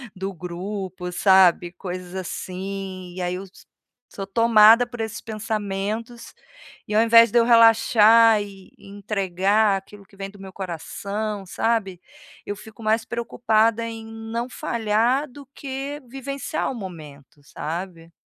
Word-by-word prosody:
do 190 Hz, +1 st, -4 dB
grupo, 180 Hz, +1 st, -6 dB
sabe, 180 Hz, -2 st, +4 dB
coisas 180 Hz, 0 st, -7 dB
assim, 185 Hz, 0 st, -6 dB
e 185 Hz, -, -5 dB
aí 180 Hz, 0 st, -2 dB
eu 190 Hz, +2 st, -6 dB
so 190 Hz, -, -19 dB, 0.5 s
sou 195 Hz, -, -6 dB
tomada 230 Hz, +2 st, +6 dB
por 240 Hz, -2 st, -7 dB
esses 220 Hz, +1 st, -5 dB
pensamentos. 215 Hz, +1 st, -4 dB, 0.5 s
E 210 Hz, -, -3 dB
ao 220 Hz, -, +5 dB
invés 230 Hz, 0 st, +7 dB
de 240 Hz, -, +2 dB
eu 230 Hz, -, +5 dB
relaxar 225 Hz, -1 st, +6 dB
e 195 Hz, -2 st, -11 dB
entregar 200 Hz, 0 st, 0 dB
aquilo 200 Hz, +1 st, -12 dB
que 195 Hz, 0 st, -22 dB
vem 195 Hz, 0 st, -6 dB
do 205 Hz, -, -17 dB
meu 195 Hz, -1 st, -10 dB
coração, 200 Hz, +3 st, -5 dB
sabe? 195 Hz, -3 st, -1 dB, 0.4 s
Eu 205 Hz, -, -5 dB
fico 220 Hz, +2 st, -14 dB
mais 220 Hz, +1 st, +1 dB
preocupada 230 Hz, -1 st, +1 dB
em 225 Hz, -1 st, -7 dB
não 225 Hz, +2 st, -5 dB
falhar 235 Hz, +6 st, 0 dB
do 280 Hz, +1 st, -12 dB
que 275 Hz, +2 st, -6 dB
vivenciar 275 Hz, +3 st, -4 dB
o -, -, -5 dB
momento, 150 Hz, -, -10 dB
sabe? 165 Hz, +3 st, -6 dB
205 Hz, 140 wpm, -23 LUFS, 190-230 Hz, 0.5 s, invés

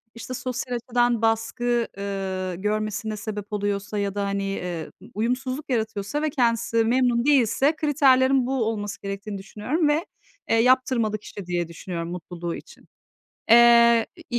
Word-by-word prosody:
işte, 230 Hz, +2 st, -7 dB
sosyal 255 Hz, 0 st, -3 dB
açıdan 240 Hz, -1 st, +1 dB
baskı, 230 Hz, +1 st, 0 dB
ııı, 190 Hz, -2 st, -3 dB
görmesine 215 Hz, +2 st, -2 dB
sebep 210 Hz, -1 st, -6 dB
oluyorsa 205 Hz, 0 st, -2 dB
ya 200 Hz, -1 st, -2 dB
da, 200 Hz, -1 st, -1 dB
hani, 200 Hz, 0 st, -2 dB
eee, 180 Hz, -4 st, -4 dB
ı -, -, -13 dB
uyumsuzluk 255 Hz, +6 st, -2 dB
yaratıyorsa 220 Hz, +2 st, -2 dB
ve 310 Hz, -, +1 dB
kendisi 230 Hz, -4 st, +1 dB
memnun 245 Hz, 0 st, +2 dB
değilse 270 Hz, +1 st, +3 dB
kriterlerin 270 Hz, -4 st, +3 dB
bu 265 Hz, -2 st, 0 dB
olması 205 Hz, -2 st, -3 dB
gerektiğini 200 Hz, +1 st, -5 dB
düşünüyorum 220 Hz, -, -2 dB
ve, 300 Hz, +4 st, +1 dB, 0.4 s
eee, -, -, +4 dB
yaptırmalı 235 Hz, -2 st, +3 dB
kişi 205 Hz, -1 st, -10 dB
diye 175 Hz, -1 st, -2 dB
düşünüyorum 170 Hz, 0 st, -6 dB
mutluluğu 175 Hz, -1 st, -5 dB
için. -, -, -13 dB, 0.7 s
Eee, 235 Hz, -1 st, +7 dB, 0.2 s
i 240 Hz, -, 0 dB
225 Hz, 140 wpm, -24 LUFS, 200-250 Hz, 0.7 s, Eee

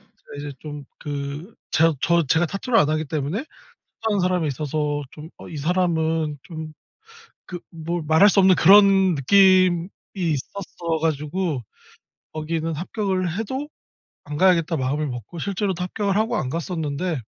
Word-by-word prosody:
제가 -, -, -16 dB
이제 145 Hz, 0 st, -6 dB
좀 145 Hz, -2 st, -8 dB
그 145 Hz, +6 st, -6 dB, 0.2 s
저 165 Hz, 0 st, +3 dB
저 170 Hz, -1 st, +3 dB
제가 160 Hz, +6 st, +2 dB
타투를 230 Hz, +7 st, 0 dB
안 150 Hz, -, +4 dB
하기 155 Hz, +1 st, 0 dB
때문에 150 Hz, +5 st, -2 dB, 0.4 s
타투 220 Hz, -, -4 dB
한 200 Hz, -, +1 dB
사람에 180 Hz, -3 st, +1 dB
있어서 145 Hz, +1 st, -2 dB
좀 155 Hz, +1 st, -11 dB
어 -, -, -10 dB
'이 160 Hz, -, -7 dB
사람은' 160 Hz, -2 st, 0 dB
좀 160 Hz, -2 st, -8 dB, 0.7 s
그 175 Hz, -1 st, -7 dB
뭐 170 Hz, +1 st, -4 dB
말할 160 Hz, +6 st, +6 dB
수 200 Hz, -, +3 dB
없는 190 Hz, -1 st, +6 dB
그런 195 Hz, 0 st, +6 dB
느낌이 185 Hz, +3 st, +4 dB, 0.3 s
있었어 170 Hz, 0 st, -3 dB
가지고 155 Hz, -1 st, -1 dB, 0.7 s
거기는 160 Hz, +1 st, -2 dB
'합격을 185 Hz, 0 st, -2 dB
해도 260 Hz, +6 st, -3 dB, 0.6 s
안 150 Hz, 0 st, -5 dB
가야겠다.' 170 Hz, -3 st, +3 dB
마음을 145 Hz, +3 st, -1 dB
먹고 125 Hz, -, -7 dB
실제로도 190 Hz, 0 st, -2 dB
합격을 200 Hz, +2 st, -1 dB
하고 225 Hz, +3 st, +1 dB
안 130 Hz, -, -2 dB
갔었는데 160 Hz, -, -3 dB
165 Hz, 295 characters per minute, -23 LUFS, 150-185 Hz, 0.7 s, 말할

